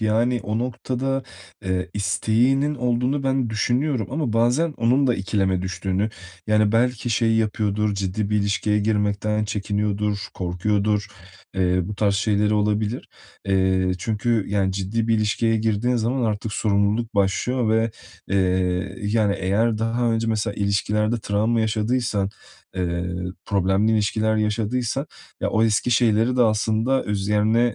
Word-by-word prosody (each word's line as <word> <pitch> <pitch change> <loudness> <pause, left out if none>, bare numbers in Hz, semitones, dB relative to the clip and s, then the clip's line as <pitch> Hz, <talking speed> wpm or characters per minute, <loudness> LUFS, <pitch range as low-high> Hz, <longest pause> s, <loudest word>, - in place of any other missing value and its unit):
yani 115 +3 +1
o 105 +3 -2
noktada, 130 +2 -2 0.4
eee, 95 -1 -2
isteğinin 120 +9 +1
olduğunu 125 +2 0
ben 135 -3 0
düşünüyorum 120 +1 0
ama 140 -4 -2
bazen 125 +8 +2
onun 125 +4 +2
da 125 - +3
ikileme 95 -2 0
düştüğünü, 95 +2 -1 0.4
yani, 105 -1 +3
belki 120 0 +1
şey 115 0 +2
yapıyordur, 105 -1 0
ciddi 100 +2 -2
bir 105 - +2
ilişkiye 100 +1 +1
girmekten 105 0 0
çekiniyordur, 105 0 -1 0.2
korkuyordur, 105 +3 0 0.5
eee, 90 -1 +2
bu 105 +4 -5
tarz 100 0 +1
şeyleri 105 +1 +1
olabilir. 105 +2 -1 0.4
Eee, 95 -1 +2
çünkü, 110 +2 0
yani, 95 -1 +1
ciddi 100 +4 -2
bir 115 - +4
ilişkiye 110 +1 +1
girdiğin 110 +3 0
zaman 120 +3 0
artık 105 0 -2
sorumluluk 105 +2 0
başlıyor 110 +5 +1
ve, 110 +1 +2 0.4
eee, 95 0 0
yani, 105 -1 +1
eğer 105 +4 +1
daha 115 +1 0
önce 115 0 0
mesela 110 -2 -1
ilişkilerde 105 +3 0
travma 110 +3 +1
yaşadıysan, 110 -2 0 0.5
eee, 85 -1 -2 0.4
problemli 100 +2 +1
ilişkiler 110 +1 +1
yaşadıysan, 110 +5 -1 0.3
ya, - - -1
o 110 - +2
eski 110 +2 +1
şeyleri 115 +1 +3
de 125 - +5
aslında 110 +3 +1
üzerine, 105 +2 +1
110 Hz, 130 wpm, -23 LUFS, 100-115 Hz, 0.5 s, de